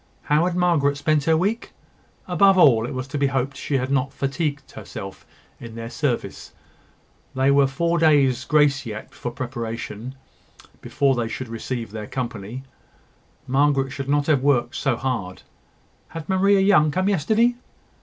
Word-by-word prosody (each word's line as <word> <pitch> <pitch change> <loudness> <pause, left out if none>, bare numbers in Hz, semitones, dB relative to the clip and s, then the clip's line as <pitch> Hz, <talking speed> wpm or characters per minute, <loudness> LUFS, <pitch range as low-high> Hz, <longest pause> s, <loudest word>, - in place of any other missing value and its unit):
How 150 +3 +2
had 180 - -2
Margaret 160 -6 +2
spent 150 0 +1
her 160 -1 +3
week? 210 +8 -2 0.5
Above 195 +1 +4
all, 120 -9 +5
it 140 - -6
was 130 +1 -4
to 145 0 -3
be 140 - +2
hoped 135 0 -2
she 140 - -2
had 130 +1 -3
not 135 0 0
fatigued 140 +1 -3
herself 95 -2 -9 0.3
in 115 -1 -10
their 115 0 -7
service. 145 -6 -3 0.8
There 135 +1 +3
were 140 -1 +4
four 170 +5 0
days' 140 -6 +3
grace 150 -3 +3
yet 110 -3 -8
for 120 - -5
preparation, 120 0 -6 0.7
before 140 -1 +1
they 120 -2 -1
should 120 +2 -6
receive 115 -1 -5
their 105 -1 -6
company. 120 -1 -5 0.8
Margaret 135 0 +1
should 140 0 -6
not 145 0 +2
have 145 -4 +2
worked 130 -3 +1
so 135 -4 0
hard. 115 -9 -4 0.6
Had 165 -1 -8
Maria 195 +1 +3
Young 190 -6 +4
come 185 +5 0
yesterday? 215 +6 +2
140 Hz, 155 wpm, -22 LUFS, 125-155 Hz, 0.8 s, all